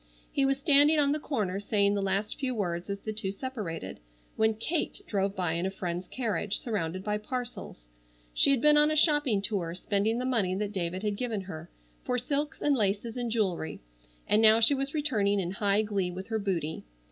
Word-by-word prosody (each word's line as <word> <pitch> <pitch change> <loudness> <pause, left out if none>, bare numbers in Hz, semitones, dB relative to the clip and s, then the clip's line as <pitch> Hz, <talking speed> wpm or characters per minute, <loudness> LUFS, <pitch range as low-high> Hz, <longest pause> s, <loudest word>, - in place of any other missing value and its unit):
He 275 - +1
was 270 0 +1
standing 290 +2 +5
on 285 -1 +3
the 300 - 0
corner 210 -11 -2
saying 200 -1 +2
the 200 - 0
last 195 +2 -1
few 260 -3 -1
words 175 -3 -3
as 200 0 -4
the 215 - -4
two 210 -3 -3
separated, 205 -7 -6 0.4
when 220 0 +2
Kate 310 +9 -2
drove 200 -1 -1
by 175 -3 0
in 170 +3 0
a - - -1
friend's 180 -2 -4
carriage, 210 -5 -2
surrounded 185 -5 -3
by 210 0 -1
parcels. 230 - -6 0.5
She - - +4
had 275 -4 +3
been 300 0 +6
on 300 0 +5
a 310 - 0
shopping 295 - +3
tour 180 -6 -2
spending 205 +4 0
the 250 - -2
money 215 -8 +1
that 205 +1 -2
David 185 0 -3
had 205 -1 -1
given 230 -4 -2
her, 170 -3 -8 0.3
for 250 - -1
silks 285 +4 -2
and 290 -1 +3
laces 210 0 -1
and 245 -1 -2
jewelry, 195 -8 -1 0.5
and 215 - +4
now 220 0 +7
she 230 +5 +5
was 275 +2 -2
returning 210 -10 +1
in 180 -2 -2
high 200 +1 +2
glee 200 -4 -1
with 185 +3 -7
her 220 -1 -1
booty. 170 -6 -2
210 Hz, 205 wpm, -29 LUFS, 190-255 Hz, 0.5 s, now